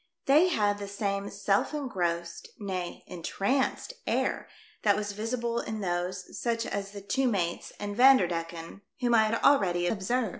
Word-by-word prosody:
They 300 +6 +6
had 205 - +1
the 200 - -5
same 200 0 -2
self 200 +9 0
engrossed, 175 - -2
nay, 185 -5 -4
entranced 205 - -1
air - - 0 0.3
that 205 -2 +4
was 205 -1 -2
visible 230 +3 -2
in 220 -2 -4
those, 180 0 -3
such 230 -1 0
as 200 -1 -3
the 200 0 -9
two 230 +7 0
mates 175 -7 -1
and 205 0 -4
Vander 255 -5 +7
decken, 165 +1 -5 0.2
whom 245 -2 +1
I 220 -1 +6
had 225 +1 -1
already 180 -11 +4
observed. 220 +5 0
205 Hz, 155 wpm, -29 LUFS, 180-235 Hz, 0.3 s, Vander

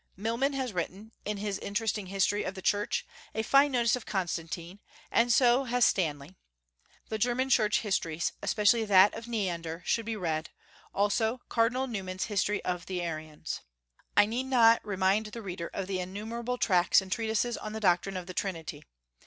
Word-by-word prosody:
Milman 230 +7 0
has 260 -4 -2
written, 190 +5 -4
in 210 0 -2
his 200 -1 -3
interesting 210 -1 -2
history 195 +2 +1
of 190 - -4
the 190 - -7
Church, 210 - 0 0.3
a 220 - 0
fine 275 +5 +5
notice 240 -3 +3
of 250 - -6
Constantine, 175 -1 -3 0.3
and 240 +1 +3
so 245 +2 +4
has 245 0 +3
Stanley. 150 -3 0 0.8
The 220 - -3
German 250 +4 +1
Church 210 -4 +3
histories, 170 -6 -1
especially 220 +2 +3
that 195 -1 +6
of 225 +1 -7
Neander, 175 -7 -3
should 230 -1 0
be 225 - -2
read; 160 -5 -2 0.4
also, 220 +4 +1
Cardinal 245 +3 +2
Newman's 190 -6 -4
History 210 -1 -1
of 180 -1 -3
the 185 -1 -3
Arians. 155 -3 -5 0.6
I 205 - +8
need 240 +5 -3
not 230 -3 +5
remind 200 +2 +1
the 230 +2 -8
reader 175 -3 -5
of 195 - -3
the 190 -1 -2
innumerable 225 +7 -4
tracts 180 -6 +4
and 190 -1 -8
treatises 225 +2 0
on 215 - -6
the 220 - -4
doctrine 190 -1 +2
of 180 - -5
the 185 - -8
Trinity. 175 -4 -4
205 Hz, 170 wpm, -29 LUFS, 185-230 Hz, 0.8 s, I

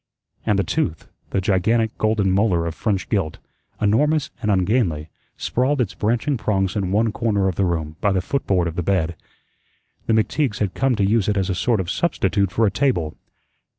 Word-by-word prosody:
And 105 - +3
the 100 - +2
tooth, 80 -2 -2 0.2
the - - 0
gigantic 110 +4 +1
golden 110 -3 +2
molar 95 -4 +2
of 85 - -3
French 100 +2 -1
gilt, 95 -8 -1 0.4
enormous 145 +9 +2
and 105 - -1
ungainly, 95 -5 +1 0.3
sprawled 130 +4 0
its 115 -7 0
branching 120 +6 0
prongs 95 -3 0
in 95 -3 -1
one 110 +2 +2
corner 105 -3 0
of 95 - 0
the 95 +3 +1
room, 80 -3 -2
by 100 - +2
the 95 - +2
footboard 90 -4 0
of 80 - -5
the 90 - -1
bed. 85 -2 0 0.9
The 115 - +3
McTeague's 115 +2 +1
had 100 -3 -1
come 135 -2 +1
to 100 -2 +1
use 105 0 +2
it 105 - +1
as 95 0 0
a - - +1
sort 110 +4 +1
of 95 0 -2
substitute 100 - +1
for 115 - +2
a 100 - +2
table. 95 - 0
100 Hz, 190 wpm, -22 LUFS, 90-115 Hz, 0.9 s, And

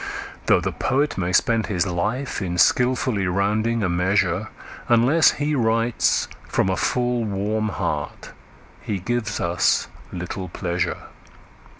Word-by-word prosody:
Though - - +5
the - - -2
poet 145 +3 0
may 90 -1 -1
spend 115 +4 +2
his 90 -5 0
life 105 +9 -2
in 90 -2 -3
skilfully 125 - +2
rounding 105 +5 0
a - - +2
measure, 90 +3 +1 0.4
Unless 125 +8 +5
he 145 +1 -1
writes 115 -2 +1 0.2
from 95 - +1
a 95 - +1
full, 125 +1 0
warm 105 +1 -1
heart - - -4 0.5
he 105 - -3
gives 120 +4 -2
us 85 0 +1 0.2
little 90 +1 -5
pleasure. 85 0 -2
110 Hz, 125 wpm, -22 LUFS, 95-120 Hz, 0.5 s, Though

